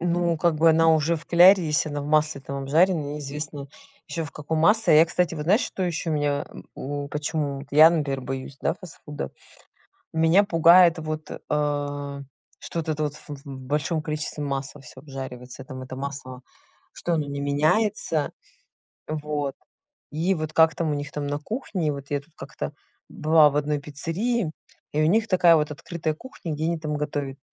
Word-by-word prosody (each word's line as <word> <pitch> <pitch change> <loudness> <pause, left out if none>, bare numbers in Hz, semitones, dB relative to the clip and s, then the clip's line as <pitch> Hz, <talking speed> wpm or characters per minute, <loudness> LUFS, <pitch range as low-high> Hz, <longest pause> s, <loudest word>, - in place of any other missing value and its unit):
Ну 175 -1 +1
как 170 +1 +2
бы 160 +1 +5
она 165 +1 +4
уже 160 +2 +1
в 160 - -11
кляре, 180 +2 +7
если 155 +1 +1
она 145 -1 -3
в - - -6
масле 150 -1 +2
там 140 0 -5
обжаренная, 155 0 +2
неизвестно 150 0 -5 0.4
ещё 165 -1 -3
в 145 - -8
каком 155 +1 -3
масле. 210 +2 +4
А - - +8
я, 165 - +7
кстати, 175 0 0
вот 150 - -4
знаешь, 200 +9 +4
что 190 - -4
ещё 170 -2 -2
меня, 145 -1 0
э, - - -11 0.2
у 145 +1 -5
почему 145 -1 -3
я, 155 +3 +8
например, 145 -5 -1
боюсь, 135 +1 -6
да, - - 0
фастфуда? 150 - -8 0.8
Меня 165 +5 +4
пугает 170 -2 +6
вот, 155 0 -5 0.2
а, 145 -1 -2 0.4
что - - -6
вот 160 - -8
это 155 -1 -1
вот 145 - -2
ф - - -14 0.2
в - - -24
большом 145 +5 -2
количестве 150 -1 -3
масла 140 +1 -4
всё 130 0 -13
обжаривается. 130 -2 -8
Там 130 0 -8
это 130 0 -8
масло, 135 -2 -6 0.5
что 175 - -2
оно 155 -3 -1
не 140 0 -4
меняется, 155 +2 +1 0.8
вот. 150 -2 -3 0.6
И 170 +5 +1
вот 155 -1 -4
как 160 -1 +5
там 165 -1 -1
у - - 0
них 145 0 -5
там 145 -1 -3
на 145 0 -1
кухне, 185 - -3
вот 140 0 -8
я 145 -1 0
тут 155 +2 -25
как-то 70 - -6 0.4
была 155 -1 +5
в 145 - -4
одной 150 0 0
пиццерии, 165 - -2 0.4
и 150 - +1
у - - +4
них 220 +7 +2
такая 180 -3 +6
вот 150 -1 0
открытая 155 +1 -4
кухня, 175 - -8
где 155 +2 -3
они 170 0 0
там 155 -1 -3
готовят. 145 -2 -3
150 Hz, 185 wpm, -25 LUFS, 145-165 Hz, 0.8 s, А